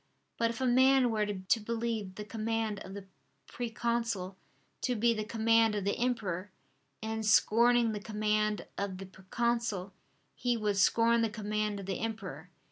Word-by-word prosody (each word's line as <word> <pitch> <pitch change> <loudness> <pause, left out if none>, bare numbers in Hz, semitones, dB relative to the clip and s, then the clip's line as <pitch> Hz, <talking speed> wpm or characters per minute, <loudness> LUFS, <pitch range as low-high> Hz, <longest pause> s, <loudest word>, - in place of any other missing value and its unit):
But 230 0 +3
if 230 +1 -5
a 260 - 0
man 260 0 +5
were 215 -1 0
to 200 +2 0
believe 225 -3 -3
the 210 - -6
command 220 -1 -2
of 190 +1 -9
the 200 -1 -8 0.4
proconsul 230 -5 -2 0.5
to 250 - 0
be 235 +1 +3
the 215 -1 -3
command 225 0 +3
of 205 - -2
the 200 - +1
emperor, 205 -7 -1 0.5
in 220 0 -2
scorning 230 +2 +4
the 210 - -3
command 215 0 0
of 200 -2 -3
the 195 - -7
proconsul 200 0 -2 0.4
he 245 -1 0
would 210 -2 0
scorn 230 +3 +4
the 225 - +1
command 210 -1 -2
of - - -8
the 190 -1 -3
emperor. 195 -8 -5
220 Hz, 160 wpm, -31 LUFS, 200-230 Hz, 0.5 s, man